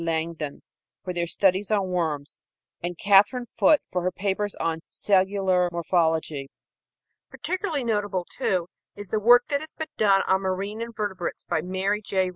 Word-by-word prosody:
Langdon 160 -2 -3 0.4
for 180 - -4
their 170 -1 -1
studies 190 +2 +2
on 200 -3 +1
worms, 155 -5 -2 0.4
and 175 0 -4
Katherine 205 +6 +4
Foot 300 +4 +3
for 180 - 0
her 180 +1 0
papers 200 +2 -2
on 165 0 -2
cellular 190 -2 +2
morphology. 160 -4 0 0.8
Particularly 370 -7 -3
notable, 205 -5 -1
too, 180 -3 0 0.3
is 205 -2 -8
the 215 - +1
work 245 +3 +6
that 285 0 0
has 315 - -10
been 315 -1 -5
done 195 -2 +4
on 190 0 +2
marine 195 +3 -3
invertebrates 210 -6 -4
by - - -1
Mary 190 +4 -1
J. 190 -2 0
190 Hz, 150 wpm, -25 LUFS, 175-210 Hz, 0.8 s, work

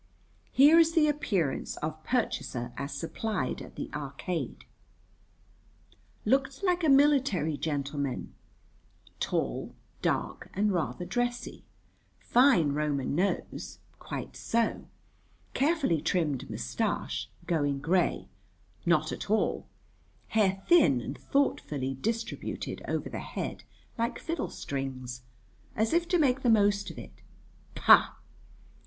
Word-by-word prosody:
Here 295 +5 +7
is 330 0 +4
the 315 -2 +4
appearance 200 - -1
of 155 0 -5
purchaser 125 - -2
as 140 +4 -4
supplied 165 - -3
at - - -11
the - - -4
Arcade: 145 0 -4 1.6
looked 270 - +1
like 360 -2 +2
a 315 - +4
military 270 - +4
gentleman; 140 -3 -3 0.9
tall, - - -2 0.3
dark, - - -1
and 205 +2 +2
rather 170 -2 -2
dressy; 245 +3 -2 0.5
fine 240 - +4
Roman 145 -3 -1
nose 185 +6 -2 0.2
(quite - - -6
so), 230 0 -1 0.7
carefully 280 - +2
trimmed 160 -5 0
moustache - - -2 0.2
going 145 -5 +1
grey 170 +5 +1 0.6
(not 155 -2 +3
at - - -6
all); 215 +1 +1 0.6
hair 195 -3 +2
thin 310 - +6
and - - -5
thoughtfully 145 - 0
distributed 225 - -3
over - - -2
the - - -5
head - - -5 0.3
like 230 +1 0
fiddlestrings, 135 - -4 0.5
as 220 +5 +1
if 340 0 +2
to 355 - +3
make 270 -4 +2
the 245 - +2
most 205 -2 +3
of - - -10
it 60 +1 -11 0.5
(pah!) - - +6
190 Hz, 110 wpm, -29 LUFS, -, 1.6 s, Here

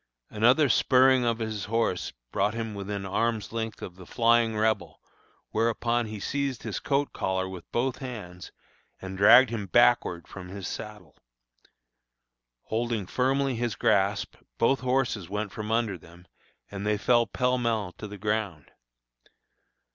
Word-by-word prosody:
Another 120 +7 +4
spurring 130 +1 +4
of 115 -1 +1
his 110 -3 -4
horse 115 -4 -1 0.2
brought 105 +3 0
him 115 -2 -4
within 100 0 -5
arm's 110 +3 -1
length 110 -1 -4
of 90 -1 -8
the 90 - -12
flying 115 -1 +2
Rebel, 110 -1 0 0.5
whereupon 115 +1 0
he 105 -1 -6
seized 140 +3 -2
his 110 -4 -3
coat 140 0 0
collar 95 0 -1
with 95 -2 -10
both 125 +2 0
his 135 - -5
hands, 90 -7 -9 0.5
and 95 0 -7
dragged 115 +5 +7
him 105 -4 -4
backward 120 -5 +3
from 90 -2 -9
his 95 0 -6
saddle. - - -8 1.5
Holding 115 -2 -2
firmly 135 +5 0
his 120 -1 -2
grasp, 100 +1 +1 0.2
both 135 +4 +3
horses 125 -7 -1
went 105 0 -3
from 105 0 -6
under 110 -5 0
them, 85 +2 -17 0.5
and 100 -1 -5
they 105 0 +1
fell 120 +2 +3
pell 125 +4 0
mell 110 -6 -1
to 105 - -6
the 105 0 -9
ground. 105 -8 -3
110 Hz, 145 wpm, -27 LUFS, 100-120 Hz, 1.5 s, dragged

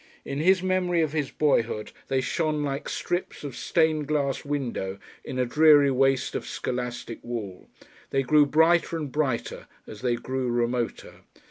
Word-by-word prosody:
In 140 - -4
his 185 +3 +3
memory 180 -2 +1
of 155 - -1
his 150 -4 -1
boyhood 115 -7 0 0.2
they 135 -1 +1
shone 155 +1 -1
like 140 0 -3
strips 175 -2 -3
of 140 -4 -6
stained 160 -3 +1
glass 140 -3 0
window 125 -9 -3 0.3
in 130 - -6
a 125 - +2
dreary 145 +1 +5
waste 135 0 +2
of - - -4
scholastic 125 -2 -4
wall, 110 -6 -6 0.4
they 135 0 +1
grew 150 +2 +4
brighter 165 +3 +3
and 150 -4 -5
brighter 135 -5 -2 0.2
as 110 - -10
they 125 -1 +1
grew 130 +1 -3
remoter. 120 0 -2
140 Hz, 155 wpm, -26 LUFS, 125-155 Hz, 0.4 s, dreary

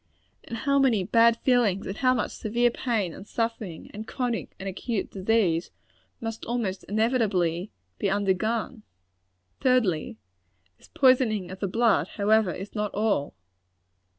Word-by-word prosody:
And 230 - -6
how 280 +3 +2
many 240 -8 +3
bad 230 +4 +4
feelings, 235 -7 +2
and 195 - -5
how 255 -1 +3
much 240 - -1
severe 240 +2 +1
pain 220 -9 -1
and 195 - -11
suffering, 225 -8 -4
and 215 +2 -7
chronic 245 -3 -3
and 195 - -6
acute 200 +3 -3
disease, 190 -4 +1 0.5
must 225 -1 -5
almost 225 -6 -2
inevitably 205 -6 +1 0.3
be 200 - +1
undergone! 205 +4 0 0.8
Thirdly 210 - +1 0.6
this - - -18
poisoning 250 - +3
of 190 - -8
the 200 - -1
blood, 205 -6 +2
however, 210 -1 +3
is 195 +4 -7
not 210 -1 -2
all. 200 - 0
215 Hz, 135 wpm, -26 LUFS, 190-235 Hz, 0.8 s, bad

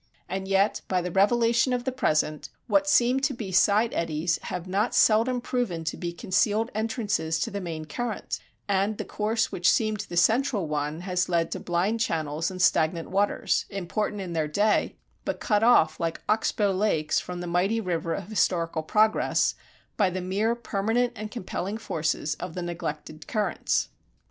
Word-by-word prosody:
And 190 0 -4
yet, 195 +2 +2
by 185 - +1
the 180 - -3
revelation 235 +5 +3
of 245 -1 -1
the 260 - -1
present, 155 - 0 0.2
what 295 0 +2
seemed 255 0 +3
to 275 - -1
be 215 -5 -6
side 210 +5 +3
eddies 165 0 -1
have 180 0 -5
not 200 +5 0
seldom 230 +3 +4
proven 235 -10 -2
to 155 - -3
be 175 - -4
the 170 - -9
concealed 210 +5 +1
entrances 205 -7 -1
to 155 - -2
the 200 0 -4
main 160 -3 -5
current, 225 +8 -4 0.3
and 200 +1 +1
the - - -4
course 215 +1 -1
which 175 0 +2
seemed 215 -2 +1
the 175 - -4
central 220 - +2
one 150 +2 -2
has 180 0 -1
led 170 -2 +1
to - - -3
blind 185 +6 0
channels 160 -5 -1
and 185 -1 -2
stagnant 165 +1 +2
waters, 200 +2 +1
important 200 +2 -3
in 180 -3 -5
their 160 -2 0
day, 205 +7 +1 0.3
but - - -3
cut 210 -3 +1
off 160 -9 +4
like 165 -1 -3
oxbow 210 -1 +1
lakes 185 -6 +1
from 180 -1 -6
the 175 - -5
mighty 180 +6 +1
river 170 -4 -2
of 195 +1 -6
historical 170 -5 0
progress 215 +7 +2 0.4
by 200 -4 +3
the 185 +1 -3
mere 200 +6 0
permanent 235 +2 0
and 215 0 -6
compelling 200 -2 -4
forces 160 -7 -1
of 180 -2 -6
the 180 - -3
neglected 155 -3 -6
currents. 215 -3 0
195 Hz, 175 wpm, -26 LUFS, 170-220 Hz, 0.4 s, seldom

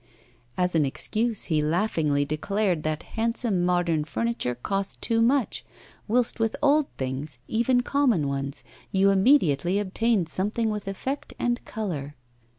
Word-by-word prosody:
As 180 0 +1
an 160 -2 +3
excuse, 220 - -1
he 155 -3 +1
laughingly 155 -3 +1
declared 180 +4 0
that 155 0 -2
handsome 230 -4 0
modern 175 -3 +1
furniture 230 - -2
cost 195 +10 -3
too 230 -1 +1
much, 255 +1 +2 0.4
whilst 240 +2 +1
with 225 -1 +1
old 295 0 +3
things, 130 +1 -4
even 240 +2 +2
common 245 - +2
ones, 140 0 -3 0.3
you 195 +1 +4
immediately 190 - +3
obtained 205 -1 +1
something 210 +6 -1
with 210 -1 -5
effect 260 +8 -4
and 240 0 -1
colour. 155 - -4
195 Hz, 135 wpm, -26 LUFS, 155-230 Hz, 0.4 s, you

